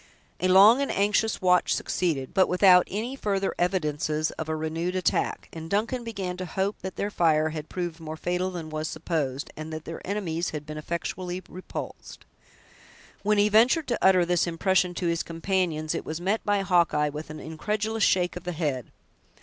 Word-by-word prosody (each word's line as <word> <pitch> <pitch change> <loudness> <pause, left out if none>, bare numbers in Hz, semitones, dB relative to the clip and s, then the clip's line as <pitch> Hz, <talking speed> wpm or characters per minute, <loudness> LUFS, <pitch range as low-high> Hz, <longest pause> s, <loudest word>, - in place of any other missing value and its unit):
A 185 - +1
long 200 +8 +7
and 280 - -1
anxious 205 +1 +1
watch 180 -1 +4
succeeded, 150 -8 -1
but 190 -1 +4
without 180 0 +6
any 230 +6 -3
further 195 -6 -1
evidences 155 -3 0
of 160 -1 -6
a 160 - 0
renewed 165 +3 -2
attack; 185 -2 0
and 160 0 -7
Duncan 230 +6 0
began 195 -6 -4
to 185 - -4
hope 195 +4 -1
that 190 -1 -6
their 205 - -2
fire 155 -4 +3
had 155 -1 -6
proved 175 -2 -4
more 160 -1 -7
fatal 180 +3 -1
than 170 -4 -6
was 155 0 -3
supposed, 150 -4 -3
and 155 +1 -7
that 155 0 -6
their 165 - -7
enemies 180 -4 -2
had 150 -1 -6
been 155 0 -6
effectually 175 +3 -4
repulsed. 185 - -8 1.0
When 210 +1 +2
he 205 +1 +5
ventured 240 +9 +4
to 240 - -1
utter 185 -2 +5
this 175 0 +1
impression 180 +1 +1
to 180 - -3
his 170 -1 +1
companions, 165 -2 -1
it - - -3
was 160 +1 -5
met 195 +5 0
by 205 -1 +1
Hawkeye 170 -5 +2
with 150 +2 -7
an 155 - -7
incredulous 210 +7 -2
shake 180 -2 +2
of 180 - -7
the 180 0 -3
head. 145 -7 -2
180 Hz, 185 wpm, -26 LUFS, 160-195 Hz, 1.0 s, long